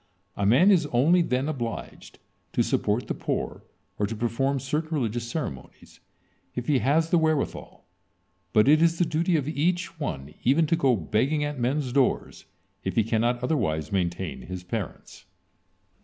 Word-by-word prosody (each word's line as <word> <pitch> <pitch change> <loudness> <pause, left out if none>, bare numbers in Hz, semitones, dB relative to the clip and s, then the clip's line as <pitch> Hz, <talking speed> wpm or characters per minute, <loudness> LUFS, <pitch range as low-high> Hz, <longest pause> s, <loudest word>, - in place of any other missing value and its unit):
A 100 - 0
man 140 - +6
is 170 -6 +3
only 150 +8 +4
then 130 -3 0
obliged 120 -7 -5 0.4
to - - +2
support - - 0
the - - -2
poor - - -3 0.4
or 105 - +1
to 115 - -4
perform 120 +5 0
certain 150 +4 -2
religious 120 -2 -2
ceremonies, 95 - -6 0.6
if 125 - -3
he 145 -4 +2
has 160 +6 +2
the 175 - +5
wherewithal, 155 -3 -2 0.7
but 105 +3 +4
it 155 +2 +6
is 165 0 +3
the 175 - +2
duty 165 +2 +1
of 145 -3 0
each 165 +2 -1
one 75 - -4
even 145 +6 +4
to 165 - +2
go 135 -6 +3
begging 120 - 0
at 145 -2 -3
men' 130 +5 +1
doors, 135 -2 0 0.4
if 95 - -3
he 115 - +4
cannot 120 +3 0
otherwise 80 - -1
maintain 90 -2 -2
his 90 -1 -7
parents. 100 +1 -6
130 Hz, 160 wpm, -26 LUFS, 110-155 Hz, 0.7 s, man